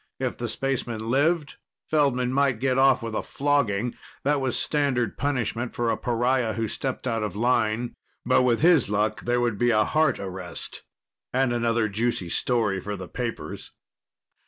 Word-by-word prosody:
If 130 -2 -2
the 120 -1 -2
spaceman 120 -3 -2
lived, 150 +3 +1 0.3
Feldman 130 -5 +2
might 135 -3 +2
get 130 0 +1
off 135 -2 +4
with 115 -1 -4
a - - -1
flogging 125 -6 0 0.3
that 145 0 +2
was 130 -2 0
standard 140 -5 0
punishment 125 -3 -2
for 120 -1 +1
a - - +1
pariah 120 -1 0
who 115 -1 -1
stepped 130 +4 -4
out 115 -3 0
of 105 -3 -3
line. 115 0 +1 0.3
But 130 +2 +4
with 120 -2 +2
his 165 - +5
luck, 105 +1 0
there 120 +1 +2
would 120 -4 0
be 120 - +3
a 110 -2 +4
heart 155 -1 +2
arrest 95 -1 -7 0.5
and 130 -1 +1
another 115 -1 +1
juicy 105 -3 -1
story 110 -3 0
for 105 +2 -4
the 90 -2 -7
papers. 120 +2 -5
120 Hz, 165 wpm, -25 LUFS, 115-135 Hz, 0.5 s, his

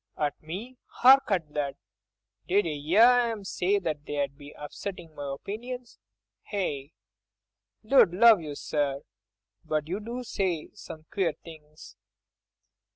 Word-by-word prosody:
"At 145 -1 -2
me! 210 +11 -7
hark 265 +2 +6
at 165 -7 -1
that! 145 -2 -2 0.7
Did 200 +2 +3
ye 155 +2 -2
'ear 240 +2 +6
'im 215 -3 -6
say 195 +1 0
that 155 -6 -3
they'd 145 -2 -2
be 145 0 -12
upsettin' 165 +2 -7
my 145 -2 -5
opinions?—Eh?—Lud 135 - -3
love 220 +1 +6
you, 150 -2 -6
sir, 140 -1 -2 0.6
but 155 -1 -2
you 185 +5 -2
do 235 +4 -6
say 185 -8 -2
some 155 0 -11
queer 180 -5 +1
things." 155 -2 -14
160 Hz, 120 wpm, -28 LUFS, 145-205 Hz, 0.7 s, hark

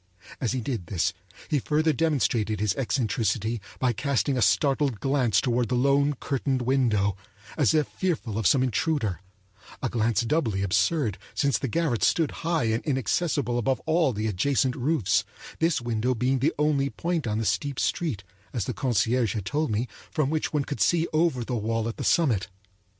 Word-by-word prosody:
As 125 -3 -1
he 130 - -1
did 110 - -4
this 85 -2 0 0.3
he 150 - +1
further 155 +4 +1
demonstrated 120 -8 0
his 105 -2 +1
eccentricity 115 -3 -1 0.2
by 125 -2 +1
casting 140 0 0
a 125 - 0
startled 135 +2 +2
glance 130 -6 +2
toward 120 -1 0
the 125 - +1
lone 140 +3 +3
curtained 130 -1 -1
window, 115 -7 +2 0.4
as 145 -3 +3
if 155 -1 +2
fearful 150 - -2
of 110 - +2
some 130 -2 +4
intruder—a 105 - -3
glance 115 -3 +1
doubly 115 -7 0
absurd, 110 - +1 0.2
since 140 -2 +1
the 135 - -2
garret 150 -4 0
stood 160 -4 +2
high 165 -4 0
and 110 0 0
inaccessible 135 -1 0
above 130 +3 0
all 160 -3 +2
the 105 -1 -3
adjacent 125 +5 +1
roofs, 130 - +1 0.4
this 165 -1 +2
window 120 +1 0
being 130 +3 +1
the 150 +6 +1
only 145 -2 +2
point 165 -3 -2
on 105 -1 -1
the 110 - -1
steep 140 +4 -1
street, 140 - -1 0.3
as 115 -7 -1
the - - -3
concierge 120 -3 +1
had 105 -4 -3
told 150 +8 -1
me, 110 +3 -1 0.2
from 150 -3 0
which 155 -1 -1
one 150 -2 0
could 145 - -5
see 170 -1 +3
over 155 -6 +2
the 125 - -4
wall 115 0 -1
at 115 - -5
the - - -4
summit. 125 - +2
130 Hz, 175 wpm, -26 LUFS, 110-145 Hz, 0.4 s, some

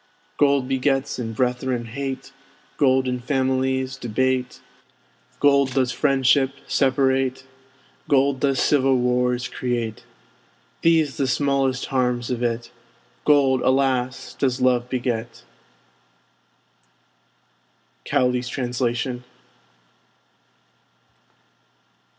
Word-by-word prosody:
Gold 140 -3 +3
begets 135 0 0
in 115 -2 -4
brethren 125 0 -1
hate; 135 +3 -6 0.4
Gold 130 -1 +3
in 125 0 -1
families 130 0 -1
debate; 125 +2 -1 0.8
Gold 140 -2 +3
does 130 -2 +2
friendship 135 +1 +2
separate; 130 -1 +1 0.6
Gold 140 -1 +3
does 135 -2 +1
civil 135 -2 +3
wars 125 0 0
create. 120 -3 -3 0.8
These 160 -4 +2
the 135 - 0
smallest 135 0 0
harms 125 -2 0
of 120 -1 -2
it! 120 -1 -2 0.5
Gold, 135 -3 +4
alas! 130 -1 0
does 130 -3 -1
love 125 -1 +2
beget. 120 -2 -3 2.6
Cowley's 125 -1 0
Translation. 125 -1 -2
130 Hz, 85 wpm, -22 LUFS, 125-135 Hz, 2.6 s, Gold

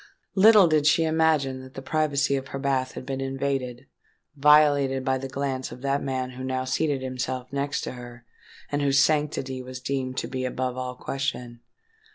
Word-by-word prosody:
Little 210 0 +7
did 155 -2 +2
she 165 +2 +4
imagine 155 -5 +1
that 130 0 -13
the 135 - -6
privacy 145 -2 +1
of 135 0 -4
her 135 - -6
bath 135 -2 -1
had - - -8
been 135 0 -4
invaded—violated 135 +1 +1
by 130 -1 +1
the 135 - -5
glance 135 -1 -3
of 125 - -10
that 140 +1 0
man 130 -2 -3
who 130 +1 -8
now 130 0 -2
seated 135 0 0
himself 130 0 -4
next 140 +1 -1
to - - -4
her, 120 -1 -11 0.5
and 145 0 0
whose 140 -1 +2
sanctity 140 -3 +1
was 130 0 -8
deemed 130 0 -3
to - - -2
be 130 0 -4
above 130 0 -2
all 125 0 -4
question. 125 -3 -4
135 Hz, 180 wpm, -25 LUFS, 130-145 Hz, 0.5 s, Little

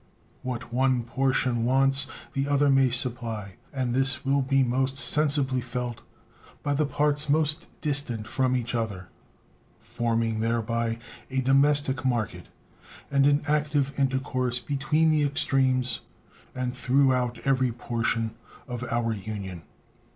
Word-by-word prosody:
What 120 -2 -5
one 130 -1 +2
portion 125 -1 +1
wants 135 +2 +3 0.3
the 135 +1 -1
other 145 0 +3
may 135 -1 +4
supply; 115 -6 -2
and 130 -3 -2
this 135 +1 +1
will 140 +1 +2
be 135 0 +2
most 130 +2 0
sensibly 140 -3 +1
felt 120 -1 -4 0.6
by 145 - 0
the 145 +1 +1
parts 145 +1 +1
most 150 +1 +2
distant 140 -7 -1
from 130 +2 +1
each 120 0 -4
other, 105 -6 -3 0.7
forming 115 -1 -1
thereby 115 0 -1 0.3
a 130 0 0
domestic 135 0 +3
market 120 -4 -2 0.6
and 140 0 +4
an 145 0 +3
active 145 -2 +1
intercourse 130 -2 0
between 145 +6 +1
the 155 -1 +2
extremes 130 -3 +1 0.5
and 125 -1 -2
throughout 125 -1 +2
every 130 -2 +2
portion 115 -1 -1 0.4
of 125 0 -5
our 115 -1 0
Union. 100 -4 -6
130 Hz, 125 wpm, -26 LUFS, 120-140 Hz, 0.7 s, may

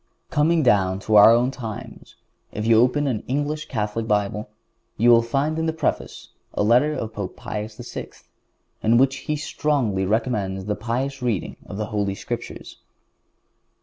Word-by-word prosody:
Coming 160 +2 +3
down 95 -6 +3
to 110 +1 0
our 105 +1 +9
own 120 +3 +4
times, 115 -6 -8 0.4
if 105 - -4
you 115 0 +5
open 135 +4 +2
an 120 -6 -1
English 145 +3 -2
Catholic 110 -1 -2
Bible 105 0 -1 0.5
you 120 +2 +5
will 115 0 +7
find 140 +7 -1
in 160 - 0
the 160 - 0
preface 160 -3 -3 0.3
a - - +1
letter 125 +8 +4
of 110 -6 -4
Pope 100 -4 -5
Pius 105 0 -6
VI., - - -7 0.7
in 115 +2 +4
which 135 +2 +3
he 150 - -3
strongly 130 -10 -1
recommends 105 -4 -1
the 105 - -1
pious 125 +5 -3
reading 115 -7 -2
of 100 - -7
the 105 - -2
Holy 100 -2 0
Scriptures. - - -7
115 Hz, 160 wpm, -23 LUFS, 105-135 Hz, 0.7 s, our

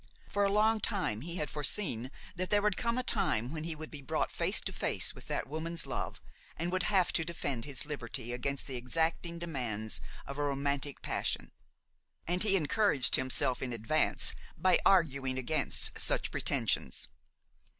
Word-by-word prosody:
For 205 - 0
a 200 - +2
long 215 +2 +3
time 185 - 0
he 170 +4 -5
had 150 -4 -2
foreseen 145 - -1 0.3
that 185 +1 -2
there 205 -1 +3
would 210 -2 +2
come 235 +3 0
a 255 - 0
time 120 - 0
when 155 -1 -4
he 165 -1 -2
would 155 0 -8
be 150 - -6
brought 135 - -1
face - - +1
to - - -3
face - - 0
with - - -13
that - - -2
woman's 160 +2 -2
love - - -4 0.4
and 170 +2 -2
would 185 0 +1
have 190 -4 +3
to 165 - +1
defend 145 -7 -3
his 140 -1 -2
liberty 125 -4 -4
against 140 +3 -2
the 130 -2 -5
exacting 165 +6 -1
demands 120 -10 -1 0.2
of 140 +1 -7
a - - +1
romantic 140 0 -2
passion; - - -2 0.7
and 180 +2 0
he 205 -2 +3
encouraged 175 - +4
himself 130 -1 +2
in 130 - -2
advance 120 +7 +3 0.2
by 185 +3 +4
arguing 140 -8 +2
against 140 +3 +2
such - - +2
pretensions. - - 0
155 Hz, 170 wpm, -32 LUFS, 130-180 Hz, 0.7 s, encouraged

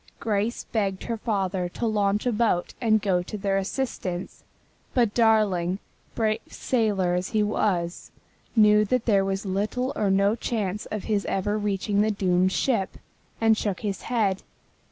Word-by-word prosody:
Grace 215 +1 -1
begged 195 -4 -2
her 230 -1 -3
father 195 -5 -1
to 235 - -4
launch 210 -1 +1
a 245 - +2
boat 210 -6 +1
and 220 -3 +3
go 185 -3 +2
to 195 +4 -6
their 195 -1 0
assistance, 190 -4 -4 0.5
but 235 -5 +3
Darling, 210 -6 +3 0.4
brave 220 -1 +1
sailor 205 -7 0
as 180 +1 -1
he 215 -1 +1
was, 185 -5 -1 0.5
knew 210 -1 +6
that 240 +3 0
there 200 -4 +3
was 195 +1 -2
little 210 +7 -1
or 205 -2 +1
no 200 +2 +3
chance 210 -4 -3
of 215 -2 -4
his 205 -2 0
ever 200 +2 -1
reaching 205 0 0
the 215 - +2
doomed 185 -2 +2
ship, 220 -3 0 0.4
and 225 -1 +4
shook 205 -3 -2
his 200 -3 -3
head. 210 -6 0
205 Hz, 155 wpm, -25 LUFS, 190-220 Hz, 0.5 s, knew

